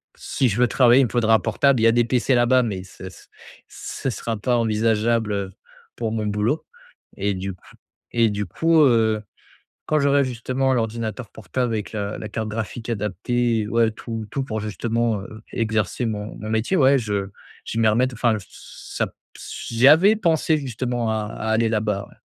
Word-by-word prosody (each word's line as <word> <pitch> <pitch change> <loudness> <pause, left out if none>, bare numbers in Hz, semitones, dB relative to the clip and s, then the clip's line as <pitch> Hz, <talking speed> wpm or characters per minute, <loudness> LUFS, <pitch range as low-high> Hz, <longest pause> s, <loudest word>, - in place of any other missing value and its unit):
si 130 -3 -1
je 100 - -2
veux 125 - +5
travailler 125 0 +5
il 130 - +4
me - - -4
faudra 115 -2 +2
un - - +3
portable. 140 -3 +2
Il - - +1
y 115 - +6
a 115 - +5
des 120 - +4
PC 125 +2 +1
là-bas, 125 +1 +4
mais 100 -5 -3
ce 95 - -14
s - - -12 0.4
ce 135 - -5
sera 115 -1 -3
pas 120 +4 +1
envisageable, 110 0 +1
heu, 100 -1 -3 0.5
pour 115 -2 -2
mon 110 -1 -2
boulot 105 +8 -1 0.5
et 100 +1 0
du 95 +1 -4
coup 90 - -20 0.5
et 115 -1 +3
du 105 0 -2
coup, 160 - +2
heu, 110 -5 +3 0.7
quand 155 0 +2
j'aurai 140 0 +3
justement 130 +2 -1
l'ordinateur 115 -1 -3
portable 120 +4 -3
avec 105 -2 -3
la 105 0 -3
la 105 - -5
carte 110 0 -4
graphique 110 +2 -5
adaptée, 110 +2 -1
ouais 115 -1 +2
tout 115 0 -6
tout 135 - -2
pour 110 -4 -4
justement, 115 0 -1
heu, 110 +3 -10
exercer 110 +1 -1
mon 105 -1 -4
mon 110 +1 -7
métier, 110 +11 0
ouais 135 -1 +5
je 100 -3 -2 0.4
je - - -5
vais 115 - +2
m'y 110 - +5
remette 125 +4 +1
enfin 115 -1 +1
j 95 - -10
ç - - -12
ça - - +2
p - - -18 0.2
s - - -8
j'y 120 +3 +4
avais 185 +9 +7
pensé 160 -5 +2
justement 120 -3 -2
à 110 -1 -1
à 110 - -5
aller 115 +1 +2
là-bas, 105 -2 -1
ouais. - - -20
115 Hz, 200 wpm, -22 LUFS, 110-125 Hz, 0.7 s, avais